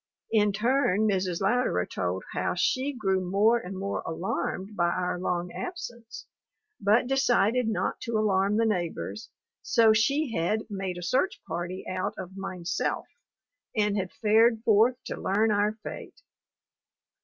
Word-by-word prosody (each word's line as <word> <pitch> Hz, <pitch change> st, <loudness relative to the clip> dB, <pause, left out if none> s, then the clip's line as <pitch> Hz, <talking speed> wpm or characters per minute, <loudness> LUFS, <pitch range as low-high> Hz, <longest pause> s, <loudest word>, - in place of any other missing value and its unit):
In 210 Hz, -2 st, +3 dB
turn 215 Hz, -1 st, +2 dB
Mrs. 185 Hz, -3 st, 0 dB
Louderer 195 Hz, -, +1 dB
told 90 Hz, 0 st, -3 dB
how -, -, -1 dB
she 260 Hz, +9 st, +1 dB
grew 195 Hz, -8 st, 0 dB
more 205 Hz, +6 st, +3 dB
and 190 Hz, -3 st, -7 dB
more 195 Hz, +1 st, -3 dB
alarmed 185 Hz, +4 st, -3 dB
by 175 Hz, -2 st, +2 dB
our 180 Hz, 0 st, -1 dB
long 175 Hz, -1 st, -2 dB
absence, 240 Hz, -11 st, -7 dB, 0.5 s
but 210 Hz, +5 st, +3 dB
decided 250 Hz, -3 st, +2 dB
not 220 Hz, -, -1 dB
to 230 Hz, -1 st, -1 dB
alarm 200 Hz, -1 st, +2 dB
the 230 Hz, -, +3 dB
neighbors, 200 Hz, +1 st, -3 dB, 0.3 s
so 225 Hz, -3 st, +4 dB
she 275 Hz, +6 st, +2 dB
had 195 Hz, +6 st, 0 dB
"made 190 Hz, -2 st, -3 dB
a 175 Hz, -, -6 dB
search 265 Hz, -, 0 dB
party 180 Hz, +2 st, -4 dB
out 185 Hz, 0 st, -2 dB
of 190 Hz, 0 st, -7 dB
mineself," 185 Hz, -3 st, -3 dB, 0.7 s
and 210 Hz, -2 st, +2 dB
had 190 Hz, -3 st, -2 dB
fared 225 Hz, +1 st, +3 dB
forth 230 Hz, +3 st, +4 dB
to -, -, -5 dB
learn 215 Hz, +3 st, +2 dB
our 205 Hz, +1 st, +2 dB
fate. -, -, -8 dB
205 Hz, 145 wpm, -27 LUFS, 185-230 Hz, 0.7 s, so